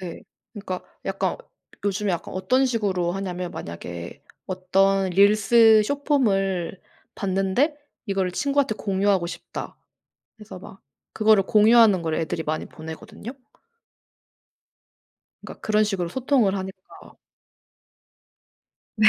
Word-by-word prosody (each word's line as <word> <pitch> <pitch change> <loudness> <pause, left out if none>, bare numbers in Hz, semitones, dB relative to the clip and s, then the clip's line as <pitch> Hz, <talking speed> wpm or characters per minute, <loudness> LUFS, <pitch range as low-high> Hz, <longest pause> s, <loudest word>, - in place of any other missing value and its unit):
네. 180 -3 -8 0.3
그러니까 195 -4 -6 0.2
약간 - - -1 0.5
요즘에 200 -1 0
약간 170 - -5
어떤 250 +9 +2
식으로 195 -8 -1
하냐면 180 -2 -4
만약에 85 - -8 0.2
어떤 190 +1 +1
릴스 215 +3 +5
숏폼을 200 - 0 0.3
봤는데 195 - 0 0.3
'이거를 195 -2 0
친구한테 280 -2 0
공유하고 195 -3 +1
싶다.' 170 - -8 0.6
그래서 215 -3 -11
막 190 0 -13 0.3
그거를 215 -2 +4
공유하는 215 -2 +5
거를 160 -1 -1
애들이 160 0 -2
많이 155 0 -3
보내거든요. 215 +9 -9 2.1
그러니까 - - -11
그런 215 0 +2
식으로 195 -5 -2
소통을 245 -1 +1
하니까. 190 0 -6 2.2
네. 215 0 +6
195 Hz, 265 characters per minute, -24 LUFS, 185-220 Hz, 2.2 s, 네